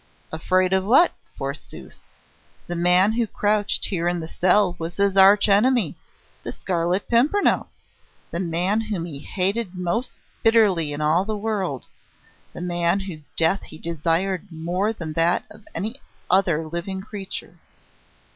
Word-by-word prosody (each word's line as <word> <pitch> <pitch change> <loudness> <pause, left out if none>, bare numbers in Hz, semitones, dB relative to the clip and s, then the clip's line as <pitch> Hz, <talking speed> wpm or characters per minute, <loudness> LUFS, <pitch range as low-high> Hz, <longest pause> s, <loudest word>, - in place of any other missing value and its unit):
Afraid 185 +3 +1
of 190 0 +2
what, 250 - +5 0.3
forsooth? - - -7 0.7
The 175 - -4
man 180 +4 +4
who 230 0 0
crouched 205 0 0
here 175 -3 -1
in 175 0 0
the 160 - -6
cell 180 +2 +2
was 165 +1 -5
his 200 -1 +2
arch 200 +2 +6
enemy, 210 - +3 0.5
the - - -5
Scarlet 175 +2 -1
Pimpernel 280 +13 +2 0.6
the 170 - -3
man 180 +4 0
whom 210 -6 -4
he 150 -5 -7
hated 190 +5 -1
most 180 +7 -2 0.2
bitterly 205 -9 +3
in 145 +1 -4
all 155 +4 +2
the 215 +1 -3
world, 200 - -3 0.7
the - - -9
man 175 +1 0
whose 160 -6 -9
death 165 +4 +3
he 155 - -12
desired 170 +4 -1
more 175 +6 -1
than 165 -8 -6
that 165 +2 +2
of 215 0 -15
any 215 +9 -3 0.3
other 175 -4 +2
living 180 +4 -4
creature. 200 -1 -7
185 Hz, 145 wpm, -23 LUFS, 170-205 Hz, 0.7 s, arch